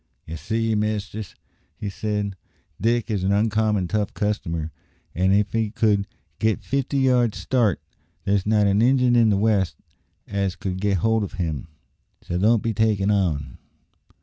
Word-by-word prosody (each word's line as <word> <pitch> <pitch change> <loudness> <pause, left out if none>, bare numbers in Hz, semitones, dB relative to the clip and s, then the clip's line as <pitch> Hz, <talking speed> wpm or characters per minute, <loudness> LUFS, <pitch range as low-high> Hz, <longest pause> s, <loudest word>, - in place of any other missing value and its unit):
"Ye 80 - -6
see, 110 +6 -1
mistress," 105 -1 -3 0.4
he 105 - -5
said, 105 0 -2 0.5
"Dick 115 +1 +1
is 100 -4 -1
an 95 - +1
oncommon 105 -2 +1
tough 105 +1 -2
customer, 85 -6 -2 0.4
an' 95 +3 +2
if 100 +1 +2
he 110 -1 0
could 110 +1 +1 0.2
only - - -39 0.3
git 110 -1 0
fifty 140 0 -1
yards' 125 -5 +2
start, 115 -8 +1 0.5
there's 100 -1 +1
not 105 -1 +3
an 100 +1 +3
Injun 125 0 +4
in 115 -2 +5
the 100 - +2
West 100 -3 +1 0.5
as 100 -2 -1
could 95 -2 -4
git 100 -1 +2
hold 110 +4 +1
o' - - -2
him - - -13 0.2
agin; 70 - -8 0.6
so 90 - -3
don't 110 +3 +3
be 115 - 0
takin' 105 -2 +2
on." 75 -10 -1
105 Hz, 165 wpm, -23 LUFS, 95-110 Hz, 0.6 s, in